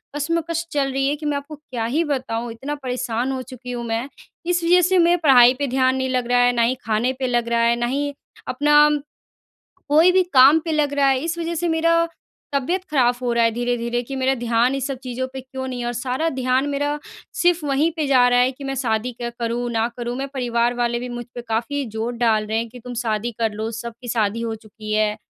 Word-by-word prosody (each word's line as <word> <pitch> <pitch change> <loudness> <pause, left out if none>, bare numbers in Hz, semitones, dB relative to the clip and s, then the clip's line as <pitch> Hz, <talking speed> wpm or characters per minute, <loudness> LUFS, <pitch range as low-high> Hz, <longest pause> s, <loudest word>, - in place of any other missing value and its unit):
कशमकश 335 +2 -1
चल 275 -2 0
रही 270 +1 0
है 285 - +1
कि 300 +1 -9
मैं 295 -1 0
आपको 285 +2 -8
क्या 255 -6 -5
ही 285 +9 +1
बताऊँ। 250 -6 -3
इतना 270 +6 -5
परेशान 250 0 -2
हो 260 -1 -3
चुकी 255 -1 -9
हूँ 240 -1 -4
मैं। 230 +3 -2 0.4
इस 350 0 0
वज़ह 355 +2 +5
से 370 +2 +3
मेरा 345 +1 +4
पढ़ाई 250 -4 +7
पे 285 - 0
ध्यान 260 0 +2
नहीं 260 0 -1
लग 250 -2 -1
रहा 245 0 +3
है, 245 0 +5
ना 240 - +1
ही 235 +2 +2
खाने 225 +4 +1
पे 260 - 0
लग 240 -1 0
रहा 235 0 +1
है, 235 0 +3
ना 240 0 -1
ही 285 +3 -1 0.3
अपना 295 +3 +4 1.0
कोई 315 +5 +5
भी 375 0 +4
काम 270 +4 +7
पे 325 - -1
लग 300 -2 +1
रहा 280 -1 +3
है। 265 -1 +3
इस 335 +1 -2
वज़ह 335 0 -2
से 345 +1 -1
मेरा 335 +1 +2 0.5
तबीयत 335 +8 0
ख़राब 245 -4 +3
हो 245 -1 0
रहा 235 0 +3
है 230 - +3
धीरे-धीरे, 240 0 -1
कि 270 +3 -6
मेरा 265 0 +1
ध्यान 240 +1 +1
इन - - -2
सब 270 +1 -3
चीज़ों 255 0 -3
पे 265 - -5
क्यों 260 0 -6
नहीं 255 -1 -5
है? 240 - -3
और 240 - -2
सारा 255 +6 -2
ध्यान 260 0 0
मेरा 290 +1 -1 0.3
सिर्फ़ 350 -3 +2
वहीं 290 +4 +2
पे 315 -3 -1
जा 255 -2 +5
रहा 245 0 +4
है 250 +1 +3
कि 270 +2 -12
मैं 270 0 -3
शादी 240 -2 -1
क्या 240 0 -5
करूँ, 235 +1 -2
ना 225 0 +1
करूँ? 240 0 -3
मैं 275 +1 -3
परिवार 240 -2 0
वाले 240 0 -1
भी 250 +1 -6
मुझ 240 0 -6
पे 240 - -5
काफ़ी 235 +6 -1
ज़ोर 220 +3 -3
डाल 220 -3 +2
रहे 220 +1 -1
हैं 230 +1 -1
कि, 250 +2 -12
"तुम 245 +1 -8
शादी 230 -1 -2
कर 225 -1 +1
लो, 220 +2 -3
सबकी 235 +2 -8
शादी 220 -1 0
हो 230 -1 -2
चुकी 215 -1 -10
है।" 215 0 +2
255 Hz, 240 wpm, -21 LUFS, 235-285 Hz, 1.0 s, पढ़ाई